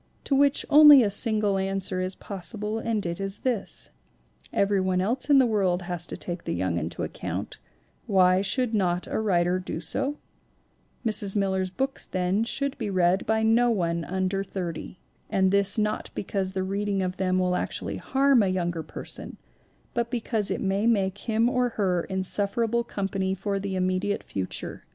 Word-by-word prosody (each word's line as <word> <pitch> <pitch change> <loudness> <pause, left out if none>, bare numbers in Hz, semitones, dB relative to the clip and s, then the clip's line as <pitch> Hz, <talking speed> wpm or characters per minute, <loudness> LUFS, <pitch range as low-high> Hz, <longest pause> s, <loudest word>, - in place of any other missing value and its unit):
To 275 - 0
which 280 0 +3
only 295 -3 +9
a 205 - 0
single 210 -2 +2
answer 190 -1 -1
is 185 +1 -2
possible 210 +3 -5
and 225 -3 -2
it 170 +1 -3
is 195 0 -4
this: 240 -6 -2 0.6
Everybody 190 -2 +1
else 240 +8 -1
in 285 - +7
the 265 - +6
world 190 -5 +1
has 175 -1 -3
to - - -6
take 175 -1 -6
the - - -2
young 90 -1 -1
into 80 +1 -4
account; - - -5 0.5
why 185 -1 +4
should 240 +4 0
not 180 -4 +1
a - - -2
writer 180 -4 +1
do 180 -3 -5
so? 275 - 0 0.9
Mrs. 210 -3 +1
Miller's 190 -2 0
books, 265 +8 -3
then, 185 +3 0
should 280 +4 -1
be 220 -4 -2
read 185 0 +2
by 220 0 +2
no 230 +2 +4
one 170 -6 0
under 190 +3 -1
thirty. 180 -3 -6 0.3
And 190 -1 +2
this 200 +1 +2
not 210 0 -1
because 195 -1 -2
the 190 -1 -1
reading 200 0 -1
of 185 0 -3
them 185 -1 +1
will 180 -1 +1
actually - - -3
harm 270 -2 +3
a 200 - +2
younger 175 -3 -1
person, 155 - -8 0.6
but 235 0 -1
because 225 -3 -1
it - - -2
may 195 +3 0
make 195 -5 +2
him 225 +1 +3
or 250 -1 +1
her 180 -4 +1
insufferable 205 +5 0
company 195 -3 -2
for 200 +1 -2
the 195 -1 -4
immediate 185 +2 -1
future. 95 -2 -3
195 Hz, 170 wpm, -26 LUFS, 185-220 Hz, 0.9 s, only